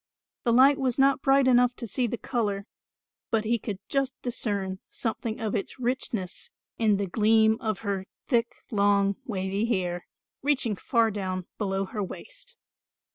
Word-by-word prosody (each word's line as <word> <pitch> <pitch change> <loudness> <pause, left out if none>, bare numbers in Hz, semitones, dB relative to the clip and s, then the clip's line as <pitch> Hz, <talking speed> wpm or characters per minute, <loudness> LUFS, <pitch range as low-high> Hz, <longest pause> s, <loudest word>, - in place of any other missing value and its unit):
The 235 - +3
light 270 +4 +6
was 255 -2 0
not 275 0 +4
bright 270 -1 +4
enough 250 -1 +4
to 235 - -5
see 240 +4 0
the 235 - -3
colour, 205 -6 -2 0.6
but 225 -1 +1
he 235 +1 +1
could 205 -3 -4
just 270 -1 -1
discern 200 -6 -2
something 225 -1 -3
of 220 -2 -2
its 200 - -3
richness 240 -7 -2 0.3
in 215 -3 +4
the 200 - -1
gleam 220 +3 +3
of 215 -3 -2
her 195 -2 -2 0.2
thick 235 -2 +2 0.2
long 200 -1 +3
wavy 195 -2 -1
hair, 180 -5 -1 0.3
reaching 265 -6 +1
far 230 +3 +2
down 185 -3 -3
below 195 -2 0
her 210 +2 -4
waist. - - -8
220 Hz, 155 wpm, -27 LUFS, 200-250 Hz, 0.6 s, light